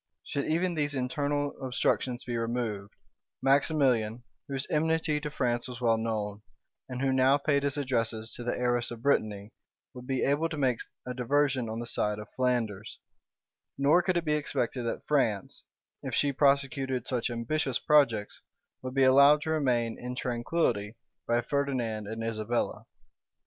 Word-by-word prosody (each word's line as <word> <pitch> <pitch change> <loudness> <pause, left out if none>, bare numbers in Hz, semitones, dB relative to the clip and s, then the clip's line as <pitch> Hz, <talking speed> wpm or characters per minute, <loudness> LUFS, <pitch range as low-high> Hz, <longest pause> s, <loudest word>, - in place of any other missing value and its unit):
Should 140 - -2
even 175 +3 +1
these 145 -2 -1
internal 145 +2 -1
obstructions 125 -1 0
be 120 - -4
removed, 115 -4 -3 0.4
Maximilian, 130 -5 +2 0.2
whose 135 -2 -3
enmity 160 0 +1
to 150 - -3
France 120 -4 -1
was 125 -1 -7
well 115 -2 +2
known, 105 -2 -3 0.5
and 130 +1 -4
who 135 -1 +2
now 130 +2 +4
paid 140 0 +1
his 140 0 -1
addresses 115 -5 -1
to 120 - -6
the 120 - -2
heiress 120 -1 0
of 120 -1 -9
Brittany, 105 -7 0 0.4
would 125 0 -10
be 130 -1 0
able 150 +4 +1
to 155 - -5
make 130 -5 +1 0.3
a 125 - -4
diversion 130 -1 +1
on 110 - -4
the 120 - -4
side 105 -2 -1
of 105 -1 -9
Flanders; 115 -5 -1 0.8
nor 145 +6 +4
could 180 0 0
it 170 - -1
be 150 - +1
expected 125 -4 -1
that - - -4
France, 115 -9 0 0.4
if - - -3
she 145 -1 +2
prosecuted 135 -2 +1
such 125 -1 -1
ambitious 125 +3 -1
projects, 120 -9 +2 0.4
would 130 0 -6
be 135 - +4
allowed 140 +3 +6
to 160 - -2
remain 125 -7 0
in 125 +1 -5
tranquillity 120 -3 -1 0.3
by 120 0 +2
Ferdinand 120 -6 -1
and 110 +1 -5
Isabella. 115 +1 -2
125 Hz, 160 wpm, -29 LUFS, 115-140 Hz, 0.8 s, allowed